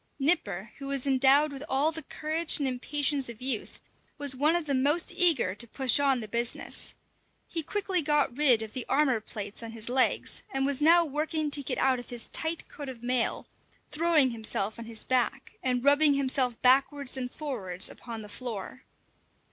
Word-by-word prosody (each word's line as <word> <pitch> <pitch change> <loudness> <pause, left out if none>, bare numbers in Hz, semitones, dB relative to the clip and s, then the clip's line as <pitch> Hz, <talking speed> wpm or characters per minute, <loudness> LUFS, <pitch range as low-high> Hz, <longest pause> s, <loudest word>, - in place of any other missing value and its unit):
Nipper, 270 - 0
who 275 - -7
was 275 -1 0
endowed 275 +2 +4
with 275 0 -7
all 280 +4 +1
the 320 0 -4
courage 315 +2 0
and 280 - -1
impatience 275 +1 +1
of 230 -2 -9
youth, 255 -4 -1 0.4
was 285 -2 +1
one 300 +5 +2
of 345 -2 -1
the 285 - -1
most 290 +8 +2
eager 330 - +3
to 235 +4 -1
push 260 +2 +3
on 270 -3 +2
the 215 - -7
business. 235 +2 -3 0.5
He 330 - -2
quickly 380 +2 -1
got 295 -4 +1
rid 255 -6 +4
of 220 - -9
the 255 - -2
armour 270 -5 +2
plates 210 -1 -6
on 230 -1 -7
his 225 0 -2
legs, 255 +1 +1
and 270 0 -1
was 280 0 0
now 335 +3 +5
working 305 +1 -2
to 285 - +3
get 275 - -3
out 260 -2 +2
of 245 - -11
his 240 -2 -3
tight 320 0 -1
coat 285 -2 -8
of 240 -3 -10
mail, 250 -1 -1 0.4
throwing 305 -4 +3
himself 220 -2 -1
on 230 - -7
his 225 -1 -2
back, 255 +1 -1
and 250 0 -1
rubbing 285 0 +5
himself 260 -3 0
backwards 270 +1 +3
and 255 -2 -3
forwards 215 - -2
upon 230 -3 -7
the - - -10
floor. 235 +2 -7
270 Hz, 190 wpm, -28 LUFS, 240-295 Hz, 0.5 s, now